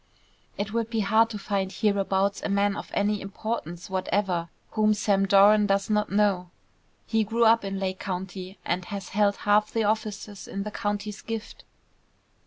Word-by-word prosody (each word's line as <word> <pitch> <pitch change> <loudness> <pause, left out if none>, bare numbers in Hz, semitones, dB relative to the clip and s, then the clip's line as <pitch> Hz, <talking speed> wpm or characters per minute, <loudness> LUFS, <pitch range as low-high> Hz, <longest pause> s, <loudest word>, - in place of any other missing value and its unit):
"It 210 +1 -3
would 230 -1 -1
be 225 -2 0
hard 220 +3 +4
to 220 - -5
find 195 -2 -2
hereabouts 200 0 +1
a - - -3
man 200 0 +2
of - - -7
any 205 0 +1
importance 195 -4 -5
whatever 185 -2 -1 0.2
whom 215 -1 +3
Sam 195 -2 +2
Doran 205 +1 +6
does 195 +1 +1
not 210 -1 +1
know. 200 -3 +2 0.6
He 225 -1 +1
grew 230 +3 +1
up 225 0 +5
in 195 0 -3
Lake 190 -1 -2
County, 190 0 -5
and 180 0 -1
has 200 0 -6
held 205 0 +2
half 210 +1 +3
the 225 - 0
offices 210 -1 -2
in 195 - -4
the 210 - -5
county's 205 -1 -3
gift." 225 -1 -6
205 Hz, 170 wpm, -26 LUFS, 195-215 Hz, 0.6 s, Doran